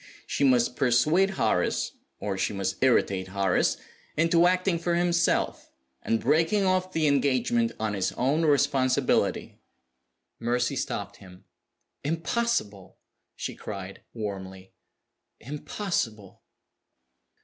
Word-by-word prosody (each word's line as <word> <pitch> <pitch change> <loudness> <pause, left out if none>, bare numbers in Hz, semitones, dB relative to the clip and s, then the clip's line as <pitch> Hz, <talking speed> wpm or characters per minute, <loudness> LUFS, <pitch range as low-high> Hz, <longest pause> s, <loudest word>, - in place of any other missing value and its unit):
She - - -2
must 125 -2 +3
persuade 150 +11 +3
Horace 100 -6 +1 0.3
(or 100 -1 -3
she 95 - -1
must 95 -1 -2
irritate 100 -7 +2
Horace) 95 -1 +1 0.4
into 165 +2 +4
acting 185 -1 +1
for 170 0 0
himself, 170 0 +1 0.3
and 115 - 0
breaking 165 - +2
off 185 0 +1
the 160 -3 0
engagement 130 -5 +2
on 110 -1 -1
his 95 -2 -1
own 140 +6 +1
responsibility." 140 -3 +1 0.8
Mercy 120 +3 0
stopped 100 -5 -4
him. 90 -2 -15 0.6
"Impossible!" 165 - -2 0.4
she - - -5
cried, 95 -2 -8
warmly. 95 -3 -7 0.7
"Impossible!" 130 - -4
130 Hz, 105 wpm, -27 LUFS, 100-165 Hz, 0.8 s, into